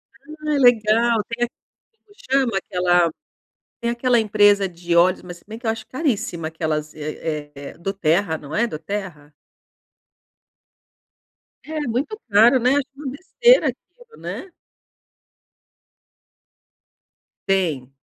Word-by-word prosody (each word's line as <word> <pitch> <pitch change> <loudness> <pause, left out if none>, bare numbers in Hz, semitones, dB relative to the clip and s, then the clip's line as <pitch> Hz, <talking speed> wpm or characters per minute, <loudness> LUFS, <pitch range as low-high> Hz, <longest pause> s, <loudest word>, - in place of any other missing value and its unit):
Ah, 300 +2 -4
legal, 230 -2 +4
tem 240 +1 -1 0.4
como 440 -2 -26 0.2
chama 265 -6 +2
aquela, 180 -2 +2 0.7
tem 235 - 0
aquela 240 0 +2
empresa 205 -2 +4
de 170 0 -3
óleos, 180 +2 +4
mas 175 -1 -9
se - - -23
bem 220 +1 -8
que 240 - -13
eu - - +3
acho 225 0 -7
caríssima, 225 - -2
aquelas 155 -1 -3
eh 150 0 -5
eh 140 0 -9
do 195 +4 -3
terra, 165 -2 +1
não 150 +1 -8
é 235 +2 +2
do 155 - -6
terra? 160 -5 -6 2.3
É 310 0 -5
muito 285 - -2
caro, 225 +5 +6
né. 250 +1 +3
Acho 285 -1 +2
uma 280 -1 -6
besteira 475 - +3
aquilo, 485 -2 -9
né. 385 - -6 3.0
Tem. 165 -10 0
210 Hz, 125 wpm, -21 LUFS, 170-255 Hz, 3.0 s, caro